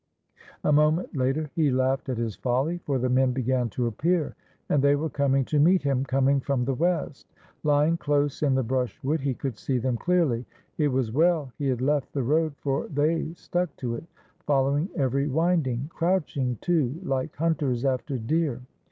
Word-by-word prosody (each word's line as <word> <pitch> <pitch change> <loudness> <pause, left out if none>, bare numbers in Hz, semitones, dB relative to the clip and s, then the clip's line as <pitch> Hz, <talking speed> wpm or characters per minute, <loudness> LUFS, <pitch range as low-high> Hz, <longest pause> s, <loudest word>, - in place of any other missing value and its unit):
A - - +2
moment 155 +4 +2
later 135 +3 0
he 155 -3 +2
laughed 130 +1 0
at 125 - -1
his 115 -3 -2
folly. 135 +8 -1
For 140 -2 0
the 130 0 0
men 130 0 +2
began 125 -1 0
to 120 +3 -2
appear, 155 +8 0 0.3
and 145 - +2
they 140 +1 +4
were 155 +2 -2
coming 135 -2 +1
to 150 - 0
meet 175 +4 +4
him, 135 -2 +1
coming 135 +1 +2
from 135 -2 -1
the 135 - 0
west. 165 -1 -1 0.3
Lying 150 +2 +3
close 145 -2 0
in 140 -3 +2
the 130 - +1
brush 125 +1 -2
wood, 150 +3 0
he 135 -2 -1
could 125 -5 -5
see 130 - -1
them 125 0 -1
clearly. 155 -8 +1 0.3
It 150 - +3
was 130 -5 0
well 155 0 +2
he 140 - -1
had 125 -2 0
left 145 +1 0
the 140 - -1
road, 155 +3 +1
for 135 -1 -2
they 155 +2 0
stuck 175 -2 -2
to 120 -3 -3
it, 115 - -6 0.4
following 140 +4 +2
every 140 -1 +1
winding, 145 -4 +1
— - - -29
crouching, 150 -8 0
too, 160 -4 0
like 135 -2 -2
hunters 145 -6 0
after 130 +1 -1
deer. 130 +1 -1
140 Hz, 185 wpm, -26 LUFS, 130-155 Hz, 0.4 s, they